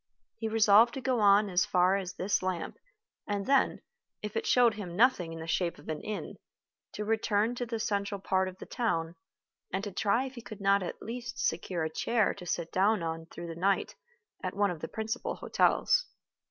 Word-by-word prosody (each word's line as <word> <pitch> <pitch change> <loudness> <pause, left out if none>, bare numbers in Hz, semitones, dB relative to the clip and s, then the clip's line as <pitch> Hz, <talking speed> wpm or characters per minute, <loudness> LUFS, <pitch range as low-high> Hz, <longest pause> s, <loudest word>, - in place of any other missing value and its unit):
He 225 - -2
resolved 220 +2 +5
to - - -3
go 255 -2 +1
on 205 0 +5
as 180 -2 +2
far 180 +1 +3
as 195 -1 -4
this 195 +2 0
lamp, 185 -2 -3 0.5
and 205 -1 -2
then, 275 0 +2 0.4
if 210 0 -5
it 225 - -1
showed 245 -3 +5
him 190 -5 -7
nothing 210 -6 +3
in 165 - -7
the 160 - -6
shape 170 +1 -1
of - - -13
an 155 - -3
inn, 215 - -5 0.6
to 210 - -4
return 220 +1 +1
to 245 0 -4
the 230 0 -2
central 200 -1 -1
part 190 0 +1
of 185 0 -8
the - - -9
town, 165 -9 -1 0.6
and 190 +2 -2
to 205 - -4
try 205 +6 +1
if 265 - -7
he 240 - -9
could 220 -3 -10
not 200 0 +3
at 180 - -6
least 245 +2 -6
secure 170 0 -1
a 160 - -1
chair 230 +3 +1
to 180 - -10
sit 170 -1 -2
down 200 0 +2
on 165 0 -4
through 170 0 -8
the 165 - -5
night 195 +3 +1 0.5
at 185 - -4
one 200 -1 +2
of 170 - -6
the 160 - -3
principal 220 +4 -3
hotels. - - +2
200 Hz, 205 wpm, -30 LUFS, 180-225 Hz, 0.6 s, resolved